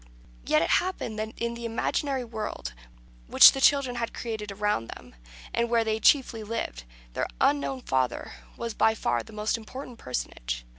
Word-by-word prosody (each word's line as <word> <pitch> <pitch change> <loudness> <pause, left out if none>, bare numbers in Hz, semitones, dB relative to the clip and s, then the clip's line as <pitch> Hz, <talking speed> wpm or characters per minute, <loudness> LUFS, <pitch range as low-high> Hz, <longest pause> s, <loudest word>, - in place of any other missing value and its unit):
Yet 155 - +4
it - - -1
happened 350 -12 -4
that 220 +1 -5
in 235 0 -2
the 235 0 -8
imaginary 255 +3 -1
world 215 - -5 0.5
which - - +9
the 270 - -4
children 265 -3 +4
had 230 -1 -3
created 220 -3 -5
around 205 - -1
them, - - -11 0.4
and 235 0 0
where 230 -1 +3
they 220 0 -1
chiefly 240 -1 +3
lived, 210 - -4 0.3
their - - -1
unknown 140 -2 +1
father 130 - -1 0.2
was 235 -1 -4
by 220 +1 +3
far 120 - 0
the - - -13
most 215 +2 -1
important 245 +2 -9
personage. - - -4
220 Hz, 165 wpm, -27 LUFS, 145-235 Hz, 0.5 s, which